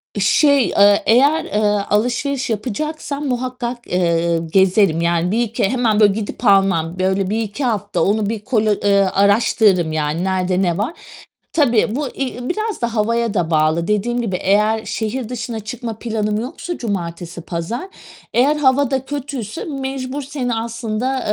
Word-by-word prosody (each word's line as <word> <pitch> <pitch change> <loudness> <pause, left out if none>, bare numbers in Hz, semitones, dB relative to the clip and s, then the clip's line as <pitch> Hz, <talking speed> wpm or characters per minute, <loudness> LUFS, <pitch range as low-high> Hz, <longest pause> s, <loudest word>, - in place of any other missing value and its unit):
Iıı, 205 - -2
şey, 280 +5 +4
eee, 200 0 +4
eğer, 280 +7 +4
eee, 210 - -2 0.3
alışveriş 245 +5 0
yapacaksam 285 +6 -3
muhakkak, 250 -1 -4
eee, 170 -1 +1
gezerim. 185 0 +2
Yani 170 +1 +1
bir 230 - +1
iki 220 -3 -1
Hemen, 230 -4 +1
böyle, 205 -2 +5
gidip 220 +3 -5
almam. 190 -4 +3
Böyle 190 +1 0
1-2 220 +4 -2
hafta 205 -6 -1
onu 205 +1 +1
bir 225 - -2
kolo 220 -4 +2
eee, 200 -1 +4
araştırırım 200 -3 +3
yani, 155 +2 -1
nerede 185 -1 0
ne 175 -3 0
var? 225 +11 -2 0.6
Tabii, 240 -6 +2
bu, 290 -1 -2
i 275 - -4
i 250 +1 -5
biraz 430 - -2
da 235 -1 -1
havaya 230 +1 0
da 175 -5 -1
bağlı. 155 +2 +2
Dediğim 235 +4 0
gibi 195 -6 -2
eğer 210 +4 +1
şehir 225 +2 -3
dışına 235 -2 -4
çıkma 225 0 -6
planım 215 -2 -1
yoksa 305 +8 -6
cumartesi 175 -5 -4
pazar, 175 - -4 0.5
eğer 275 +5 +3
hava 280 -2 +2
da 265 -1 -1
kötüyse 280 -3 -5
mecbur 270 -1 -4
seni 260 -3 -3
aslında, 230 +3 -2
220 Hz, 155 wpm, -19 LUFS, 195-255 Hz, 0.6 s, böyle